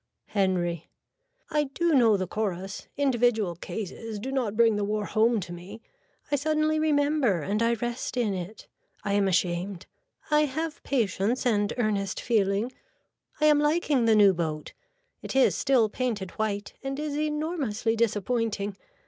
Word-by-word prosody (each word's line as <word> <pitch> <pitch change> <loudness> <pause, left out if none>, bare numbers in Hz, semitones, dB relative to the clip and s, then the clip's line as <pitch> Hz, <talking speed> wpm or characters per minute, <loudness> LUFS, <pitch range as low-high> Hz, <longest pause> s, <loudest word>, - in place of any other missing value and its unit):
(Henry.) 175 -4 0 0.6
I 300 -1 +2
do 330 +5 0
know 230 -6 +5
the 185 - -2
chorus. 195 -1 -4
Individual 240 -9 +2
cases 210 +5 -6
do 250 +6 -5
not 240 -6 -1
bring 230 -2 +5
the 205 - -1
war 210 +1 -1
home 225 +2 +2
to 175 -1 -7
me. 185 +6 -9 0.5
I 285 - +3
suddenly 310 +1 +1
remember 290 - +2
and 205 +5 -1
I 230 0 +3
rest 240 +2 -4
in 225 -5 +1
it. 185 +3 -7 0.4
I 200 - -1
am 200 -1 +3
ashamed. 180 0 -1 0.5
I 300 0 +5
have 310 +3 -4
patience 230 -1 0
and 205 -4 +2
earnest 205 -4 -1
feeling. 210 0 +1 0.7
I 305 - +3
am 300 -1 +6
liking 295 -4 +2
the 225 -1 +5
new 200 -2 +6
boat. 155 -3 -3 0.5
It - - -6
is 270 - +5
still 255 -5 +3
painted 215 -5 -3
white 205 -2 -3
and 270 +1 -4
is 300 -1 -3
enormously 300 -7 -1
disappointing. 220 -2 -1
225 Hz, 150 wpm, -27 LUFS, 200-270 Hz, 0.7 s, am